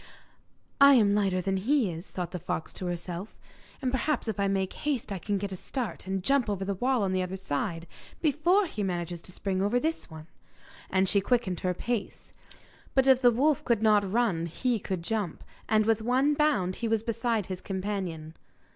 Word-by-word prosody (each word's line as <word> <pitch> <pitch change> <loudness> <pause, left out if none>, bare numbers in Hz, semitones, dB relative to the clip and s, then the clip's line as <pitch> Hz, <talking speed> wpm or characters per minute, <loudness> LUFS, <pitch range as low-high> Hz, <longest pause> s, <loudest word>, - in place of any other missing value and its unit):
'I 280 0 +9
am 210 -4 +4
lighter 195 -3 +1
than 190 +1 0
he 235 0 +2
is,' 165 +3 -8
thought 180 -2 -4
the 180 - -4
fox 160 - -4
to 185 - -4
herself, 175 +3 -5 0.5
'and 255 - +1
perhaps 265 0 0
if 215 -2 -3
I 200 - +2
make 195 -1 0
haste 275 -8 -2
I 195 - -3
can 205 +2 -1
get 200 0 -4
a - - -4
start, 215 -2 -5
and 190 -1 -2
jump 275 -1 +2
over 195 -2 -2
the 200 - -1
wall 245 +3 +1
on 190 -1 0
the 185 - +1
other 185 +1 -3
side 170 -1 -3 0.3
before 340 +6 +3
he 220 - -5
manages 175 -3 -3
to 185 - -10
spring 190 0 -2
over 210 +5 +2
this 320 -3 -2
one.' 160 -1 -10 0.6
And 190 0 +2
she 200 +1 +3
quickened 200 -5 0
her 180 -1 -1
pace. 235 +1 -4 0.6
But 265 0 +4
if 265 -1 +6
the 245 - +7
wolf 275 +5 +2
could 230 -3 +1
not 205 -3 +4
run 200 -8 +1
he 235 +7 -1
could 185 -3 -4
jump, 205 -3 -3 0.3
and 215 -1 +3
with 225 0 +2
one 260 +6 +2
bound 210 -12 +1
he 235 - -2
was 225 -1 +1
beside 230 -2 -1
his 185 0 -6
companion. 185 -5 -4
205 Hz, 200 wpm, -28 LUFS, 185-245 Hz, 0.6 s, I